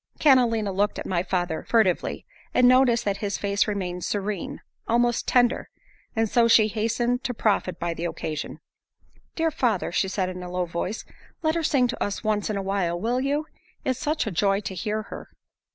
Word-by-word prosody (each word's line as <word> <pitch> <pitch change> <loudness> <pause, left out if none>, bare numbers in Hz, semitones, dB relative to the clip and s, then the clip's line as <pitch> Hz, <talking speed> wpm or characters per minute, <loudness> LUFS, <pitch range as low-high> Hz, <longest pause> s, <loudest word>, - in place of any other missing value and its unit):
Catalina 235 -7 +4
looked 205 +2 0
at - - -5
my 175 -2 0
father 175 -3 -2
furtively, 215 -7 +1 0.3
and 250 0 +6
noticed 255 -2 +4
that 200 -1 0
his 205 -1 -2
face 200 +1 +1
remained 180 -4 -3
serene, 205 -2 -3 0.3
almost 240 0 +1
tender, 245 0 +2 0.5
and 225 0 +2
so 235 +2 +3
she 220 -2 +5
hastened 230 +3 0
to 250 - -2
profit 195 -5 0
by 170 0 -1
the 165 +1 -4
occasion. 160 -2 -4 0.7
"Dear 325 -1 +1
father," 230 - 0
she 190 - +1
said 190 -1 -1
in 180 0 -6
a 180 - -6
low 180 0 -1
voice, 175 +5 -4 0.4
"Let 315 0 +2
her 335 - 0
sing 275 -5 +3
to - - -2
us 205 +2 -3
once 215 -1 0
in 210 - -1
a 195 - -2
while; 190 -3 -1
will 240 +6 0
you? 290 +3 0 0.4
It's 260 -1 0
such 305 -1 0
a 220 - -2
joy 195 +3 +2
to 195 - -5
hear 215 +3 -2
her." - - -9
210 Hz, 190 wpm, -25 LUFS, 185-240 Hz, 0.7 s, and